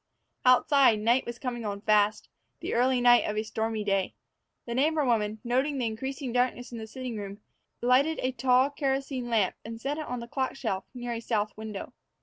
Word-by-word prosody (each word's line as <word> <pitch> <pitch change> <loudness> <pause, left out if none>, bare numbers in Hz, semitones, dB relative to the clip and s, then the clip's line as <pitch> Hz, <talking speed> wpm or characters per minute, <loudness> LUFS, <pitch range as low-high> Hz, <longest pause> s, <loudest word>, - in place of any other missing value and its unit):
Outside, 255 -1 +5
night 235 +5 +2
was 235 0 -5
coming 240 -2 -4
on 200 -1 -4
fast 210 0 +2 0.3
the - - -4
early 250 +2 +3
night 245 0 +6
of 210 - -2
a 215 - +1
stormy 220 0 -2
day. 195 -2 0 0.5
The 235 - -4
neighbor 300 +4 +2
woman, 220 -3 +1
noting 260 +4 0
the 250 - 0
increasing 260 +3 -4
darkness 245 0 0
in 235 - -6
the 220 - -7
sitting 250 -1 -6
room, 200 0 -7 0.4
lighted 270 +6 +3
a 255 - +1
tall 255 +2 +3
kerosene 270 -3 -2
lamp 215 -6 +1
and 225 +1 -7
set 285 +6 -3
it 310 - -5
on 250 0 -3
the 235 - -7
clock 260 +2 -2
shelf 195 -7 -3
near 240 -1 -4
a 230 - -3
south 215 -3 -1
window. 215 -2 -7
240 Hz, 195 wpm, -28 LUFS, 220-260 Hz, 0.5 s, night